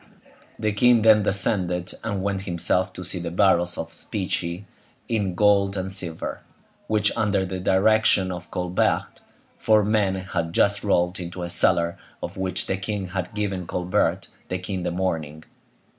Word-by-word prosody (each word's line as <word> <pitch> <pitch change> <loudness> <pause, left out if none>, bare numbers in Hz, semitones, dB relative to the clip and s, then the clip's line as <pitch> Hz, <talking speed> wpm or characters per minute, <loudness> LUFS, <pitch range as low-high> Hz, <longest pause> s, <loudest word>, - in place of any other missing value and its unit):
The 110 -1 0
king 120 +2 +4
then 110 -1 +7
descended 90 -3 0
and 100 -4 -2
went 100 -1 -1
himself 90 0 0
to 90 - -7
see 90 +1 -2
the 85 0 -4
barrels 85 0 +3
of 80 0 -5
specie, 90 -2 -2 0.4
in 100 -6 -1
gold 100 0 +3
and 95 0 -3
silver, 90 -4 -3 0.5
which, 105 -1 +1
under 100 -3 +1
the 95 0 -4
direction 95 0 +3
of 90 -1 -7
Colbert, 90 0 -1 0.4
four 110 -2 +4
men 105 -3 +2
had 85 -3 -3
just 100 +2 +2
rolled 90 -2 +1
into 90 0 -6
a 85 - -4
cellar 85 -1 +2 0.2
of - - -5
which 95 -1 -2
the 95 - -1
king 95 -1 -4
had 95 0 -4
given 100 -4 -2
Colbert 90 0 0 0.2
the 90 - -1
key 90 +2 -6
in 95 - -2
the 90 - -1
morning. 80 -4 -3
95 Hz, 160 wpm, -24 LUFS, 90-100 Hz, 0.5 s, then